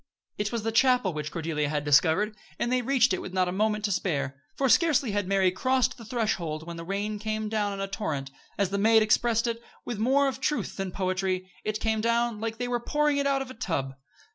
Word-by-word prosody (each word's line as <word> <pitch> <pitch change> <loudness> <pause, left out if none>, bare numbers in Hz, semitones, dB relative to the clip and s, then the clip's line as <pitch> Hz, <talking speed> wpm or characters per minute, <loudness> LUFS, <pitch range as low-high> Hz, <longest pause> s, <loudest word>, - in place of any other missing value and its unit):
It 210 0 -1
was 230 -3 -2
the 225 - -1
chapel 250 -5 +3
which 150 0 -4
Cordelia 160 -3 -2
had 150 -1 -1
discovered, 170 +8 +3 0.2
and 240 - -1
they 255 0 +2
reached 250 -3 +3
it 185 - -1
with 185 - -7
not 185 -1 +2
a - - -1
moment 210 +2 0
to 205 - 0
spare, 140 -7 -1
for 275 - +1
scarcely 275 -2 +3
had 205 -2 -1
Mary 190 -1 +3
crossed 255 +5 +1
the 235 -2 -12
threshold 190 -9 -2
when 170 0 -7
the 165 - -6
rain 205 +3 -3
came 215 0 -2
down 210 -2 0
in 195 - -6
a 195 - -2
torrent. 150 -9 -3 0.3
As 200 -2 +1
the 200 - 0
maid 220 +1 +5
expressed 230 +1 +2
it, 230 -1 -2 0.2
with 235 -4 -4
more 270 +5 +3
of 265 -1 -3
truth 295 +3 -1
than 195 -1 -3
poetry 185 0 -2
it 215 0 -2
came 220 -1 0
down 235 -1 +1
"like 225 0 -3
they 245 +1 -2
were 245 -1 0
pouring 295 +4 +1
it 280 0 +1
out 275 -1 +1
of 260 - -10
a - - -8
tub." 165 - -2
215 Hz, 235 wpm, -27 LUFS, 185-240 Hz, 0.3 s, maid